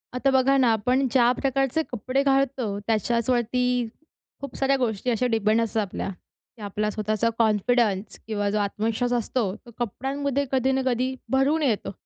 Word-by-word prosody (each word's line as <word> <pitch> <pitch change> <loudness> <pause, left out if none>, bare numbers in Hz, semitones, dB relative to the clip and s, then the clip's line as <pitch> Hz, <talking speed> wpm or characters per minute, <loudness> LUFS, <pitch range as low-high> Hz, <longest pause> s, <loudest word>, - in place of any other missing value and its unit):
आता 270 +2 +2
बघा 265 +1 +4
ना, 255 -3 +4
आपण 250 +5 +1
ज्या 240 -1 +4
प्रकारचे 270 +2 +1
कपडे 255 +3 -1
घालतो 270 -6 +1
त्याच्याचवरती 240 +2 +1 0.5
खूप 280 -2 -7
साऱ्या 275 0 +2
गोष्टी 240 -2 -1
अशा 235 +2 0
डिपेंड 220 0 +2
असतात 225 -1 0
आपल्या 200 -1 -4 0.5
की 230 - -15
आपला 210 +1 -2
स्वतःचा 215 +2 0
कॉन्फिडन्स 215 -2 +1
किंवा 205 -2 -1
जो 210 - 0
आत्मविश्वास 220 +4 -1
असतो 240 0 0 0.2
तो 240 - -13
कपड्यांमध्ये 275 +4 -2
कधी 265 0 +2
ना 265 0 +1
कधी 255 +1 0 0.2
भरून 270 +5 +2
येतो. 230 -9 0
245 Hz, 155 wpm, -25 LUFS, 215-265 Hz, 0.5 s, बघा